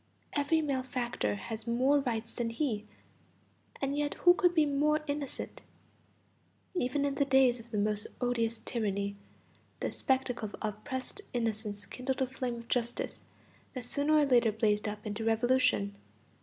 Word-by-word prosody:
Every 310 +2 +2
malefactor 255 - -1
has 220 - -6
more 260 +5 +4
rights 230 -4 -2
than 235 -1 -1
he; 230 -4 -1 0.9
and 275 0 -1
yet 290 0 0
who 355 - +6
could 355 -1 +3
be 310 -2 +5
more 300 +2 +2
innocent? 285 -2 -4 1.1
Even 285 -4 0
in 280 - 0
the 280 +1 +2
days 265 -2 +4
of 230 +1 -13
the 220 - -3
most 210 0 +1
odious 230 -2 0
tyranny, 200 -3 -1 0.6
the - - -1
spectacle 260 -4 0
of - - -9 0.2
oppressed 260 - -4
innocence 220 -3 -2
kindled 255 +1 -3
a 265 - +3
flame 255 -1 -3
of 235 0 -9
justice 240 -1 -1 0.5
that 250 -2 -4
sooner 285 +5 +2
or 300 -1 +6
later 240 -4 +4
blazed 210 -1 +1
up 210 +1 -5
into 210 +1 -3
revolution. 225 -2 +3
245 Hz, 150 wpm, -31 LUFS, 220-280 Hz, 1.1 s, who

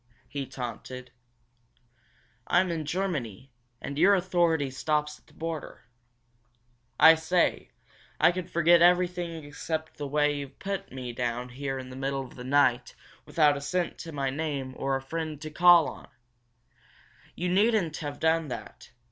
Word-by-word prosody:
he 140 -2 -5
taunted. 125 0 -7 1.4
"I'm 185 -1 +3
in 160 -2 -3
Germany, 145 - -3 0.3
and 140 +1 -5
your 200 +4 +6
authority 170 -6 +1
stops 150 +2 -1
at - - -34
the - - -22
border! 165 -2 -6 1.2
I 160 - +10
say, 165 +2 0 0.5
I - - +6
could 180 0 -5
forget 170 0 +4
everything 175 -2 +2
except 155 +2 -5
the 145 - -4
way 150 +1 +1
you've 140 -2 -7
put 195 0 -5
me 125 -2 -6
down 120 +1 -3
here 135 +1 -4
in 130 -1 -8
the - - -9
middle 135 0 -2
of - - -14
the 125 - -8
night, 130 -2 +2 0.3
without 150 -3 +3
a 140 - -5
cent 175 +4 -2
to 165 - -7
my 135 -3 -2
name 140 -3 -3
or 135 0 -1
a 135 - -2
friend 155 +2 -4
I - - -22
can 155 0 -8
call 175 -1 +7
on! - - -9 1.3
You 180 +1 -2
needn't 195 -4 +2
have 145 -2 -6
done 160 0 +2
that. 125 - -8
150 Hz, 155 wpm, -28 LUFS, 135-170 Hz, 1.4 s, I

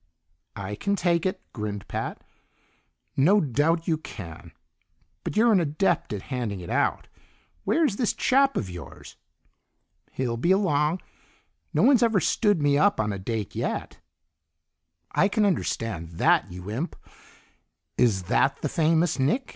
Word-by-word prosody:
"I 100 0 -5
can 200 - -1
take 175 -2 +1
it," 185 0 -4
grinned 105 -3 -5
Pat. - - -4 0.9
"No 185 +10 +5
doubt 160 - +1
you 160 -3 +1
can, 85 - -9 0.7
but - - -4
you're 230 +2 +5
an 200 - +5
adept 170 +2 0
at 105 -3 -4
handing 115 -6 -2
it 90 +5 -7
out. 140 +3 0 0.6
Where's 300 -11 +2
this 240 - +1
chap 275 +1 +3
of 100 - -2
yours?" 90 -1 -10 1.0
"He'll 120 -3 -2
be 150 +9 0
along. 175 -4 +2 0.7
No - - +2
one's 265 -4 +5
ever 225 -4 +3
stood 205 -2 +2
me 145 0 +3
up 205 - +3
on 105 -1 0
a 100 - -5
date 105 +1 -4
yet." - - -3 1.1
"I 195 - +3
can 210 +1 +1
understand 115 - -1
that, 80 - +2
you 90 +3 -7
imp! 140 +11 -3 1.0
Is 100 -6 +2
that 60 -8 +1
the - - 0
famous 160 0 +2
Nick?" 200 - +1
150 Hz, 145 wpm, -26 LUFS, -, 1.1 s, No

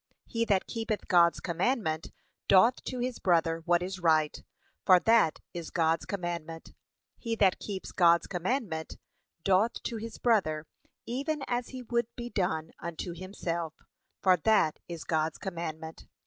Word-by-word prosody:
He 230 0 -1
that 195 -4 +2
keepeth 225 -2 -3
God's 170 -2 +5
commandment, 170 - -1 0.4
doth 225 +6 +5
to 255 - -4
his 250 0 -3
brother 165 -2 +2
what 175 0 +3
is 185 +1 -5
right, 155 -3 +2 0.4
for 185 -1 +7
that 225 -5 +4 0.2
is 170 -2 -6
God's 165 -2 +1
commandment. 170 -4 -5 0.5
He 230 -2 -2
that 195 -4 +3
keeps 195 -3 -6
God's 170 -2 +4
commandment, 180 - -3 0.5
doth 195 +4 +3
to 230 - -3
his 225 +1 -7
brother 160 -10 +1 0.4
even 280 +4 -2
as 245 0 -1
he 255 -1 -7
would 235 -1 0
be 240 0 -6
done 160 -4 -1
unto 170 +1 -5
himself, 170 -3 -4 0.5
for 185 -1 +5
that 160 -3 +2
is 170 -2 -6
God's 160 0 0
commandment. 160 -4 -6
180 Hz, 145 wpm, -29 LUFS, 165-225 Hz, 0.5 s, for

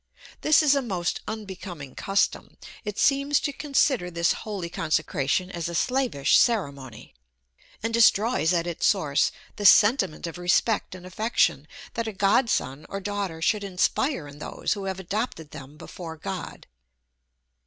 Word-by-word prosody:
This 310 +1 +5
is 290 -2 +5
a 280 - +2
most 185 -8 -2
unbecoming 185 -9 -7
custom; 195 0 -1 0.3
it 210 -1 -5
seems 280 +1 +3
to 285 - -2
consider 275 -10 +1
this 170 -1 +1
holy 200 -5 -5
consecration 160 +1 -1
as 170 -2 -4
a 170 - -5
slavish 250 - +2
ceremony, 140 - -1 0.7
and 225 0 -2
destroys 225 -5 +4
at 170 -2 +1
its 175 -2 0
source 150 -8 +2 0.3
the 205 - -4
sentiment 210 - +4
of 170 +1 -6
respect 185 +3 +1
and 180 -1 -11
affection, 215 +6 0 0.3
that 230 -1 -3
a 220 - -4
godson 195 - +1
or 195 - -4
daughter 200 -5 -4
should 210 +3 +1
inspire 195 - 0
in 145 0 -12
those - - -2
who 200 -2 -6
have 190 -1 -3
adopted 190 -4 -4
them 145 0 -11
before 165 0 -9
God. - - -6
190 Hz, 145 wpm, -25 LUFS, 165-225 Hz, 0.7 s, This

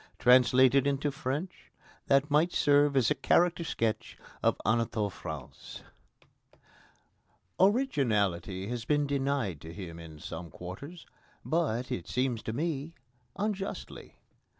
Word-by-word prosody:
Translated 130 +2 +5
into 140 +1 0
French, 145 +6 -5 0.4
that 140 +2 +3
might 155 +4 +3
serve 145 -1 +3
as 125 -1 +3
a - - +6
character 170 +5 +2
sketch 115 -8 -2 0.2
of - - +2
Anatole 110 -2 +1
France. 80 -8 -9 1.8
Originality 110 - +1
has 120 0 -4
been 145 +3 +1
denied 135 - -1
to 80 - -9
him 85 -2 -8
in 80 -2 -10
some 80 +2 -7
quarters, 95 - -9 0.4
but, 130 -7 0
it 85 - -4
seems 125 -3 -1
to - - -4
me, 155 +4 -3 0.4
unjustly. 200 -1 -4
130 Hz, 115 wpm, -30 LUFS, 105-150 Hz, 1.8 s, a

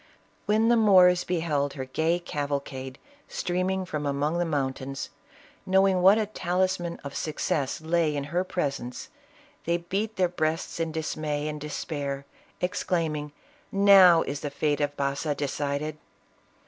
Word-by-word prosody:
When 220 +2 +3
..the 240 - +5
Moors 185 -5 +6
beheld 155 -5 -1
her 130 -2 -5
gay 160 +6 0
cavalcade 140 -5 -4 0.3
streaming 185 +1 -1
from 150 -5 -3
among 145 +4 0
the 175 - +1
mountains, 135 -2 -3 0.5
knowing 190 -1 +3
what 195 +4 +7
a 220 - +1
talisman 185 -3 -1
of 140 -1 -7
success 150 -2 -2
lay 160 -1 +1
in 140 - -2
her 180 +1 +2
presence, 140 -9 -4 0.6
they 170 +1 +1
beat 195 +6 -3
their 185 -1 +2
breasts 165 -1 -2
in 165 -1 -1
dismay 155 -1 -3
and 150 -1 -5
despair, 145 -2 -4 0.4
exclaiming 160 -4 -1 0.3
" - - -35 0.2
Now 180 -4 +8
is 140 - -4
the 145 - -4
fate 145 +1 -1
of 145 0 -1
Baza 140 +2 -1
decided 145 +1 -3
155 Hz, 140 wpm, -27 LUFS, 145-180 Hz, 0.6 s, Now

